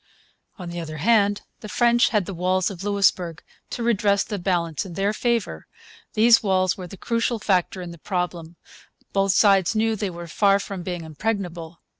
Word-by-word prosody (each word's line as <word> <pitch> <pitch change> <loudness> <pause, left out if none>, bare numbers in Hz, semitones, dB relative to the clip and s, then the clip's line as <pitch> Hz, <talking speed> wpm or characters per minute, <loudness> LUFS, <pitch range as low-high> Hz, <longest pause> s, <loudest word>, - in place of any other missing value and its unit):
On 180 -4 -7
the 175 - -5
other 155 -2 -6
hand, 205 +3 +2 0.2
the 215 - -9
French 240 +1 +3
had 210 -5 +1
the 195 - -6
walls 185 +2 0
of 190 -1 -8
Louisbourg 190 -5 +1 0.3
to 240 - -4
redress 205 -3 +2
the 205 -2 -5
balance 175 -4 -1
in 185 -3 -9
their 195 +3 0
favour. 230 - -2 0.5
These 230 +2 +6
walls 185 -3 +1
were 185 -2 -8
the 195 - -11
crucial 230 +2 -1
factor 190 -2 0
in 175 - -7
the 170 - -12
problem. 175 -2 -4 0.6
Both 195 -1 +2
sides 195 0 +4
knew 220 0 +1
they 205 -2 -2
were 175 -1 -8
far 195 +4 +3
from 195 -2 -6
being 175 -1 -5
impregnable. 170 -1 -4
195 Hz, 180 wpm, -23 LUFS, 175-210 Hz, 0.6 s, These